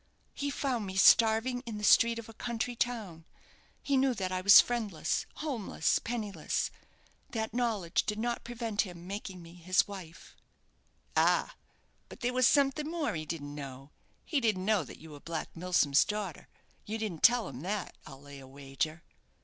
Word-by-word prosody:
"He 285 Hz, -, -3 dB
found 255 Hz, -7 st, -2 dB
me 190 Hz, -, -6 dB
starving 225 Hz, +5 st, +5 dB
in 220 Hz, -2 st, -4 dB
the 210 Hz, -, -7 dB
street 230 Hz, +3 st, +5 dB
of 230 Hz, -, -7 dB
a 225 Hz, -, -11 dB
country 240 Hz, +2 st, -3 dB
town. 215 Hz, -10 st, -3 dB, 0.6 s
He 280 Hz, -, +1 dB
knew 260 Hz, -1 st, +2 dB
that 190 Hz, -3 st, -3 dB
I 185 Hz, 0 st, -1 dB
was 200 Hz, +1 st, +10 dB
friendless, 215 Hz, -10 st, 0 dB
homeless, 275 Hz, -9 st, -1 dB
penniless. 210 Hz, -9 st, -3 dB, 0.6 s
That 220 Hz, -3 st, -3 dB
knowledge 220 Hz, -8 st, 0 dB
did 210 Hz, -, -1 dB
not 235 Hz, +2 st, -2 dB
prevent 230 Hz, -3 st, -2 dB
him 175 Hz, -3 st, -7 dB
making 190 Hz, -2 st, -6 dB
me 165 Hz, 0 st, -13 dB
his 180 Hz, +2 st, +1 dB
wife." 185 Hz, -5 st, -10 dB, 0.8 s
"Ah! -, -, +2 dB, 0.5 s
but -, -, -12 dB
there 245 Hz, 0 st, 0 dB
was 255 Hz, -1 st, +4 dB
something 285 Hz, +2 st, +2 dB
more 320 Hz, -9 st, -2 dB
he 155 Hz, -2 st, -5 dB
didn't 145 Hz, -2 st, -5 dB
know. 135 Hz, -1 st, -8 dB, 0.3 s
He 300 Hz, -, 0 dB
didn't 210 Hz, -5 st, 0 dB
know 210 Hz, -4 st, +2 dB
that -, -, -11 dB
you 160 Hz, 0 st, -13 dB
were 145 Hz, -, -10 dB
Black 165 Hz, +1 st, -6 dB
Milsom's 165 Hz, -5 st, +3 dB
daughter; 210 Hz, -5 st, -5 dB, 0.4 s
you 220 Hz, +2 st, -4 dB
didn't 210 Hz, -8 st, -4 dB
tell 240 Hz, -1 st, +5 dB
him 130 Hz, -1 st, -8 dB
that, 195 Hz, +3 st, -3 dB
I'll 135 Hz, 0 st, -11 dB
lay 140 Hz, -1 st, -11 dB
a 135 Hz, -, -12 dB
wager." 140 Hz, +4 st, -4 dB
205 Hz, 175 wpm, -31 LUFS, 165-235 Hz, 0.8 s, was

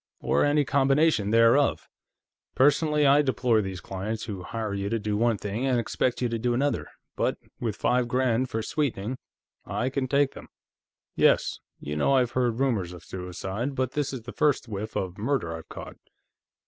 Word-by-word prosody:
Or -, -, +2 dB
any 145 Hz, 0 st, +3 dB
combination 135 Hz, -3 st, +3 dB
thereof. 115 Hz, +5 st, +4 dB, 0.7 s
Personally, 150 Hz, +2 st, +3 dB
I 140 Hz, +1 st, +6 dB
deplore 125 Hz, -5 st, +2 dB
these 95 Hz, -2 st, -5 dB
clients 105 Hz, +4 st, -4 dB
who 100 Hz, -4 st, -5 dB
hire 110 Hz, +2 st, -4 dB
you 100 Hz, 0 st, -2 dB
to 115 Hz, -, 0 dB
do 105 Hz, -1 st, -2 dB
one 115 Hz, 0 st, +2 dB
thing 105 Hz, +7 st, -3 dB
and 125 Hz, -2 st, +2 dB
expect 125 Hz, +2 st, -1 dB
you 120 Hz, -, +1 dB
to 115 Hz, 0 st, -2 dB
do 120 Hz, +1 st, 0 dB
another, 140 Hz, +3 st, 0 dB, 0.3 s
but -, -, 0 dB, 0.2 s
with 110 Hz, -4 st, -2 dB
five 125 Hz, +1 st, +1 dB
grand 125 Hz, 0 st, +1 dB
for 110 Hz, 0 st, -2 dB
sweetening, 125 Hz, -4 st, -2 dB, 0.4 s
I 130 Hz, +2 st, -2 dB
can 135 Hz, -1 st, -1 dB
take 140 Hz, +1 st, +2 dB
them." -, -, -11 dB, 0.7 s
"Yes. -, -, +3 dB, 0.2 s
You 75 Hz, -, -5 dB
know, 135 Hz, -, +2 dB
I've 125 Hz, -2 st, +2 dB
heard 120 Hz, -2 st, 0 dB
rumors 110 Hz, -10 st, 0 dB
of 85 Hz, -2 st, -11 dB
suicide, 95 Hz, +8 st, -4 dB
but 130 Hz, -1 st, -1 dB
this 145 Hz, -2 st, -1 dB
is 130 Hz, -4 st, -6 dB
the -, -, -8 dB
first 150 Hz, -5 st, +1 dB
whiff 105 Hz, 0 st, -5 dB
of 95 Hz, +1 st, -3 dB
murder 110 Hz, -9 st, -1 dB
I've 80 Hz, -, -10 dB
caught." -, -, -9 dB
120 Hz, 180 wpm, -26 LUFS, 105-135 Hz, 0.7 s, I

